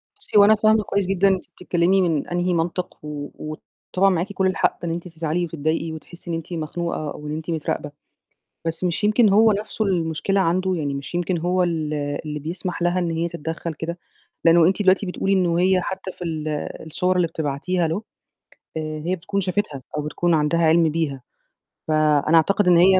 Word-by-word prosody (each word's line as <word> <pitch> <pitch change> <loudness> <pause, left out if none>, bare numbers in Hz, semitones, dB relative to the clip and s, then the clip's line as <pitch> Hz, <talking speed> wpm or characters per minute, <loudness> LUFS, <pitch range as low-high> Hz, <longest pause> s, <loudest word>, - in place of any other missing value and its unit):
بُصي 410 - -2
هو 205 - +9
أنا 215 +1 +6
فاهمة 215 0 +3
كويس 200 -1 0
جدًا 195 +1 +2
أنتِ 190 -2 +1
بتتكلمي 180 +2 +1
من 165 -5 0
أنهي 175 +1 0
منطق 175 +2 -2
و 145 -1 -5 0.6
وطبعا 195 +2 +4
معاك 185 +2 -1
كل 190 0 +1
الحق 185 - +1
إن 170 - -1
أنت 170 +2 -4
تزعلي 165 +1 -2
وتتضايقي 160 0 -2
وتحسّي 170 +2 -11
إن - - 0
أنتِ 165 +2 -6
مخنوقة 160 -1 -3
أو 150 - -8
إن 150 - -3
أنتِ 160 +1 -6
متراقبة. 150 -2 -2 0.8
بس 165 +2 -2
مش 180 +3 -1
يمكن 215 +1 +4
هو 220 +2 +6
نفسه 215 +1 -2
المشكلة 175 +1 0
عنده، 185 +1 +1
يعني 145 -4 -2
مش 140 +5 -6
يمكن 175 0 0
هو 180 +2 +1
ال 160 -3 -1
اللي 150 +1 -3
بيسمح 175 +4 -4
لها 175 +1 +2
إن 170 -2 -1
هي 165 +1 -1
تتدخل 165 0 -4
كده. 165 +3 -5 0.5
لأنه 165 0 +7
أنتِ 190 +3 +1
دلوقتي 190 +1 +4
بتقولي 195 +1 -1
إن 185 -2 +3
وهي 180 +2 +3
حتى 190 +1 -5
في 180 - -9
ال 155 -2 -3 0.4
الصور 180 +4 0
اللي 180 -2 +3
بتبعتيها 160 +3 -1
له، 165 +6 -2 0.8
هي 155 +3 -2
بتكون 190 +3 -2
شافتها، 180 -6 -2 0.2
أو - - 0
بتكون 170 +3 0
عندها 155 +1 +2
عِلم 165 0 +4
بيها 150 -4 -2 0.7
فأنا 155 0 +3
أعتقد 195 +4 +3
إن 175 -1 +6
هي 185 +2 +6
170 Hz, 190 wpm, -22 LUFS, 160-185 Hz, 0.8 s, هو